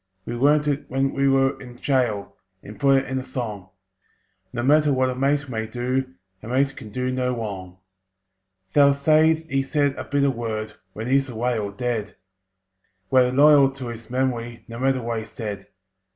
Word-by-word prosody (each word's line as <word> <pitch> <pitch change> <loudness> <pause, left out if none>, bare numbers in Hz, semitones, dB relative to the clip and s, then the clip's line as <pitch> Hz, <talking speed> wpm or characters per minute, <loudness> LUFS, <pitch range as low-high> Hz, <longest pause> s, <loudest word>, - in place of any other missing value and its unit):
We 120 - -4
learnt 145 +4 +3
it 145 0 -2
when 135 +1 0
we 140 0 +1
were 135 0 +2
in 125 -2 -11
gaol, 120 -6 -1 0.3
And 105 0 -11
put 135 +1 +4
it - - -10
in 130 0 -2
a - - -5
song: 105 -8 -5 0.8
"No 120 - -3
matter 150 +2 +4
what 130 -1 +2
a - - -5
mate 140 +2 +1
may 110 -3 -3
do, 125 -3 -2 0.3
A - - -10
mate 135 +3 +1
can 110 - -9
do 125 +4 -2
no 125 -1 -1
wrong!" 95 -5 -6 1.0
They'll 140 -1 +5
say 155 +3 +4
he 160 -4 -2
said 145 0 +1
a - - -4
bitter 140 0 +1
word 110 -3 -4 0.2
When 110 - -6
he's 135 +1 +2
away 120 0 -1
or 100 -1 -3
dead. 110 0 -3 1.0
We're 125 -1 +4
loyal 140 0 +6
to 130 -3 -7
his 115 -1 -9
memory, 120 -2 -2
No 115 0 -8
matter 130 -1 +1
what 115 -1 -2
he 110 - -7
said. 105 -3 -6
130 Hz, 180 wpm, -23 LUFS, 115-135 Hz, 1.0 s, loyal